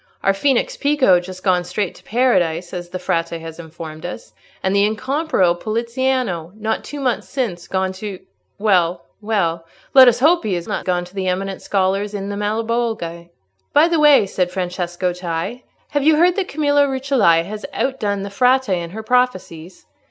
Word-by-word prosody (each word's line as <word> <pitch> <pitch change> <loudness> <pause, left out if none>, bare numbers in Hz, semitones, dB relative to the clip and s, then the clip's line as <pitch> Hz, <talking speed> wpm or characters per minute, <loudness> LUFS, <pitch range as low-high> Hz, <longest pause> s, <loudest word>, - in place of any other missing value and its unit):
Our 195 - +3
Phoenix 255 +6 +1
Pico 280 -11 +3
just 185 +1 -9
gone 180 -2 +2
straight 195 +2 -3
to - - -18
Paradise, 180 -8 +1
as 175 -1 -6
the 185 - -4
Frate 170 -2 -1
has 165 0 -9
informed 160 -1 -9
us; 175 - -7 0.3
and 190 +1 +1
the 200 - +4
incomparable 220 - +1
Poliziano, 230 -3 -2
not 220 +1 -2
two 290 - -7
months 255 -4 -1
since, 220 -11 -3
gone 190 0 -1
to—well, 190 -2 -2 0.2
well, 170 -6 -1 0.3
let 265 -1 +9
us 245 0 +4
hope 325 +5 +4
he 205 -4 -1
is 170 -1 -5
not - - -3
gone 180 -1 0
to 180 - -16
the 190 -1 -3
eminent 190 +1 -2
scholars 195 +1 0
in 200 0 -4
the 205 - -3
Malebolge." 215 -5 -2 0.4
"By 300 +3 +6
the 335 -2 +1
way," 295 -7 +6
said 185 -2 -1
Francesco 180 -1 -2
Cei, 180 +7 -4 0.2
"have 290 -1 0
you 310 +2 +5
heard 350 +3 +4
that 395 -3 -1
Camilla 290 -1 +2
Rucellai 260 -11 +2
has 210 +4 -7
outdone 210 -7 -1
the 200 - -6
Frate 255 +3 +2
in 175 -3 -1
her 220 +5 -7
prophecies? 190 -9 -1
200 Hz, 175 wpm, -19 LUFS, 175-250 Hz, 0.4 s, let